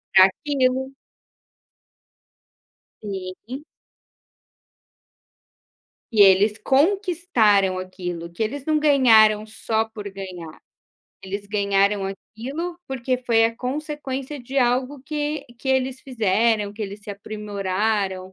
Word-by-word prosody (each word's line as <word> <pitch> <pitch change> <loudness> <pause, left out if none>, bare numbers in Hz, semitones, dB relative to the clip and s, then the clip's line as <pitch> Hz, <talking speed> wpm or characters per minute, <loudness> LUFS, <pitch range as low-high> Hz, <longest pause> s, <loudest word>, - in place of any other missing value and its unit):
Aquilo. 260 +6 +3 2.1
Sim. 200 +7 -7 2.5
Que 215 -3 +4
eles 200 +2 +6
conquistaram 270 - +2
aquilo, 180 -2 -6
que 170 - -8
eles 255 +6 -2
não 310 -1 +2
ganharam 225 -8 +5
só 220 0 -1
por 210 -2 -7
ganhar, 185 -5 -8 0.6
eles 200 +1 -6
ganharam 200 -1 +1
aquilo, 270 - -6
porque 255 -1 -2
foi 235 -3 +3
a 230 0 0
consequência 275 +1 -4
de 255 +3 -7
algo 255 +2 +1
que 295 0 -3
que 265 - -6
eles 265 0 0
fizeram, 220 -3 +1
que 210 - -12
eles 205 0 -5
se 205 - -8
aprimoraram, 200 -2 -2
220 Hz, 100 wpm, -23 LUFS, 200-265 Hz, 2.5 s, eles